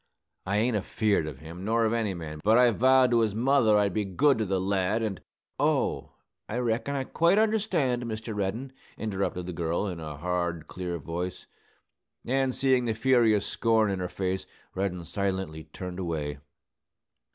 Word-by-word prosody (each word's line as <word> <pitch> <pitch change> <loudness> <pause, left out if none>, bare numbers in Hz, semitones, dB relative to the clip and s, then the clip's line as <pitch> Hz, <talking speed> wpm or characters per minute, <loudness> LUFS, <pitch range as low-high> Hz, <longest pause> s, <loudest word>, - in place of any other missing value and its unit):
I 100 +2 +1
ain't 115 +2 +2
afeard 105 -4 0
of 70 -3 -8
him, 85 +3 -9
nor 115 +2 +2
of 110 - +1
any 110 -5 0
man. 75 -3 -7
But 110 +3 +5
I 125 -1 +6
vowed 130 +2 +4
to 120 - +4
his 110 -3 +1
mother 120 -3 +4
I'd 100 -2 +2
be 105 - 0
good 125 +8 +2
to 110 - +1
the 95 -1 0
lad, 95 +3 0
and 105 -4 -3 0.2
" - - -54
"Oh, - - 0 0.4
I 110 - -2
reckon 125 +3 -1
I 135 - -1
quite 170 +7 +2
understand, 195 - +1
Mr. 110 -1 -5
Reddin," 110 +7 -3 0.2
interrupted 100 -4 -2
the 90 - -5
girl, 85 +3 -1
in 90 -4 -4
a 75 -2 -6
hard, 85 -1 -2
clear 90 -2 -4
voice; 85 +3 -5 0.8
and, 130 0 +1
seeing 130 -2 +2
the 115 -2 0
furious 115 -3 +3
scorn 110 -2 +2
in 95 - -2
her 90 -1 -3
face, 95 0 -3 0.3
Reddin 90 -2 -2
silently 95 -5 -3
turned 90 +3 -7
away. 75 -5 -3
105 Hz, 175 wpm, -28 LUFS, 90-120 Hz, 0.8 s, I